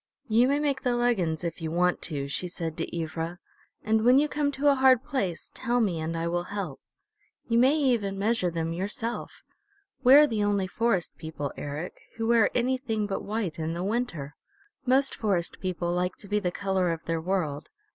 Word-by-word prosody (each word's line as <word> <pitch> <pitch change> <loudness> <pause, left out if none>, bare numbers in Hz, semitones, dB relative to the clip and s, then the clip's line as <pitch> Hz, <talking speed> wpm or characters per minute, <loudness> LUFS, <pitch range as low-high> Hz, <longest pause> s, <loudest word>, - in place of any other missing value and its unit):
"You 230 +2 +4
may 280 +2 +2
make 285 -2 0
the 250 -3 +1
leggins, 190 -10 +1
if 170 -1 -4
you 160 - -2
want 180 +2 +1
to," 140 -3 -3
she 160 +6 -1
said 165 -2 -4
to - - -3
Ivra, 165 +2 -4 0.5
"and 220 0 +2
when 250 +3 +6
you 295 +2 +4
come 295 -1 0
to 285 +2 +3
a - - +6
hard 260 -2 +5
place 200 - -3
tell 245 -1 0
me 190 -8 +1
and 160 +1 -3
I 165 +1 -1
will 175 +1 -1
help. 190 -8 -5 0.7
You 230 0 +3
may 265 +4 +5
even 235 -10 +1
measure 205 -2 +1
them 165 -1 -2
yourself.... 225 +7 -4 0.6
We're 275 +4 +9
the 220 -6 -1
only 205 -2 +1
Forest 195 -2 -1
People, 150 -3 -5
Eric, 145 +5 -6 0.2
who 225 - -1
wear 230 -1 +4
anything 245 -3 0
but 200 -1 -3
white 205 -6 -3
in 160 +1 -2
the 175 - -3
winter. 195 - -2 0.5
Most 270 +2 +3
Forest 190 -6 -1
People 175 -2 -2
like 180 +1 -1
to 205 - -11
be 210 +1 +1
the 185 -3 -1
color 190 -2 0
of 165 0 -5
their 165 -1 -1
world. 160 -5 -2
200 Hz, 195 wpm, -27 LUFS, 170-240 Hz, 0.7 s, We're